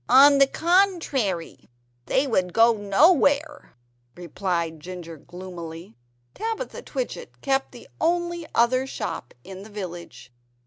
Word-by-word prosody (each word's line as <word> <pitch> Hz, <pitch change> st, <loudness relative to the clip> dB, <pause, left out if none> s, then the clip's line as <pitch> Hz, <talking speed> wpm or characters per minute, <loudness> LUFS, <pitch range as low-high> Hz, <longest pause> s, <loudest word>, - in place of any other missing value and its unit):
"On 275 Hz, +3 st, +7 dB
the 275 Hz, -, +6 dB
contrary, 320 Hz, -, 0 dB, 0.4 s
they 265 Hz, -, +2 dB
would 185 Hz, -9 st, 0 dB
go 230 Hz, +1 st, +5 dB
nowhere," 280 Hz, -, +2 dB, 0.4 s
replied 170 Hz, -2 st, -3 dB
Ginger 175 Hz, 0 st, -8 dB
gloomily. 170 Hz, -3 st, -9 dB, 0.4 s
(Tabitha 450 Hz, +3 st, -4 dB
Twitchit -, -, -6 dB
kept 270 Hz, -1 st, 0 dB
the 240 Hz, -, -13 dB
only 345 Hz, 0 st, 0 dB
other 255 Hz, +3 st, +3 dB
shop 120 Hz, -, -5 dB
in 190 Hz, 0 st, -10 dB
the 210 Hz, -, -11 dB
village. 175 Hz, -, -8 dB
230 Hz, 115 wpm, -24 LUFS, -, 0.4 s, On